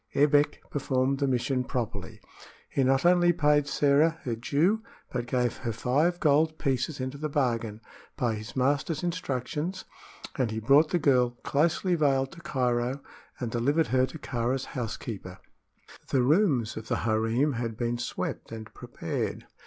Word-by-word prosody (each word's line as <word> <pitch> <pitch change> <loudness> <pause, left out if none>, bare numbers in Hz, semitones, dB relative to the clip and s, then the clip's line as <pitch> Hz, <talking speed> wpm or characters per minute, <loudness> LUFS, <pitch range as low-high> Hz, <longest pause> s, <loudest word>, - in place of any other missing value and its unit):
Ebbek 145 +1 +3
performed 135 -1 0
the 140 - +1
mission 130 0 0
properly. 125 -3 -4 0.5
He 135 - +1
not 135 +2 +2
only 175 0 +5
paid 150 -3 +3
Sĕra 150 +3 +3
her 125 -8 -2
due, 155 - +1 0.3
but 120 -1 -2
gave 125 -2 0
her 115 - -3
five 145 +10 +1
gold 155 +1 +3
pieces 135 +1 -1
into 130 +2 -4
the 155 0 -2
bargain, 115 -6 -1 0.4
by 120 -2 +1
his 110 +1 -7
master's 140 +6 0
instructions; 170 +1 -3 0.5
and 125 -3 +2
he 110 0 -3
brought 140 +7 +5
the 175 - +2
girl, 125 -6 +2
closely 165 +5 +1
veiled, 135 -5 +2
to 170 - -12
Cairo 125 -3 0 0.4
and 120 -3 -3
delivered 145 +8 +1
her 130 0 +4
to 160 - -9
Kāra's 125 -1 -2
housekeeper. 110 -6 -5 0.7
The 130 -2 +2
rooms 140 - +2
of 110 0 -7
the - - 0
harem 115 +6 +1
had 115 -2 -3
been 120 0 -1
swept 120 - -4
and 110 -1 -8
prepared. - - -4
135 Hz, 155 wpm, -28 LUFS, 120-150 Hz, 0.7 s, only